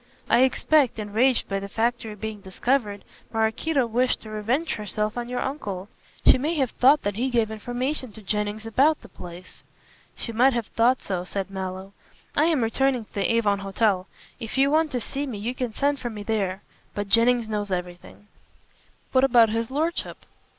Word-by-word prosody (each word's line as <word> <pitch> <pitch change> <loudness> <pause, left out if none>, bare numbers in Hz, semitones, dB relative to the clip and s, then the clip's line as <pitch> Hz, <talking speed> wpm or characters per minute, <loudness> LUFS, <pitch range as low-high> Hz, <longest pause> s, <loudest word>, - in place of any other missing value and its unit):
I 235 - +4
expect, 265 +1 +3
enraged 225 +4 +1
by 195 0 -1
the 200 0 -7
factory 225 0 -1
being 215 0 -6
discovered, 205 +2 -1 0.3
Maraquito 240 +6 +1
wished 245 +2 +1
to 215 - -10
revenge 235 +10 -1
herself 210 0 -2
on 240 0 -4
your 250 - -2
uncle. 205 -9 -4 0.4
She - - +7
may 310 +6 0
have 265 -6 0
thought 275 +4 +4
that 205 0 -2
he 255 +3 0
gave 230 -3 +1
information 245 +4 -3
to 220 - -12
Jennings 210 +2 -2
about 275 +7 +3
the - - -13
place." 175 +1 -11 0.5
"She 230 - -5
might 250 +4 +4
have 235 -2 -1
thought 240 +4 +2
so," 185 -3 -2
said 195 +1 -4
Mallow. 190 0 -5 0.4
"I 300 - +4
am 315 -7 +2
returning 250 +1 +1
to - - -33
the 200 - +1
Avon 210 -3 +2
Hotel. 195 -1 0 0.3
If 230 +1 -6
you 275 +1 +4
want 315 +1 +3
to 250 - 0
see 280 +5 -4
me 235 -6 -5
you 225 +5 -3
can 250 -2 -3
send 285 +5 0
for 240 - -4
me 210 -2 -7
there. 200 -3 -1 0.3
But 205 -1 -2
Jennings 230 +2 +4
knows 210 -2 -2
everything." 180 +2 -6 0.8
"What 260 0 +4
about 240 -4 +6
his 225 +1 -1
lordship?" 315 +5 -2
225 Hz, 185 wpm, -25 LUFS, 205-260 Hz, 0.8 s, She